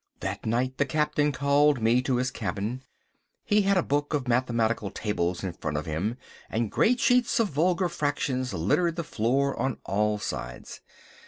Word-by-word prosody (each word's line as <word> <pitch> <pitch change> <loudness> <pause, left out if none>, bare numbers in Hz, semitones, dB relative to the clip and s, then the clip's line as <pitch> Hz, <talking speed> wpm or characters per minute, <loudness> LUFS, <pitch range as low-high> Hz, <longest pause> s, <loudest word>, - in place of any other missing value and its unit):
That - - -4
night 125 +3 0
the 145 - +3
Captain 150 +1 +1
called 140 0 +3
me 115 +3 +3
to 130 0 0
his 125 +1 0
cabin. 110 +3 -3 0.6
He 210 0 +3
had 200 0 +2
a 180 - +3
book 145 +2 0
of 140 -4 -2
mathematical 115 -4 +1
tables 90 -5 -2
in 95 -3 -3
front 75 -3 -4
of 75 - -3
him, 90 +10 -2 0.3
and 115 -1 -1
great 245 +2 +3
sheets 245 -1 +3
of 225 -3 +2
vulgar 175 +5 +1
fractions 140 -5 -1
littered 105 - +1
the 170 - -3
floor 135 +2 0
on 130 -3 -1
all 105 +2 +1
sides. 60 -11 -6
130 Hz, 170 wpm, -27 LUFS, 105-150 Hz, 0.6 s, the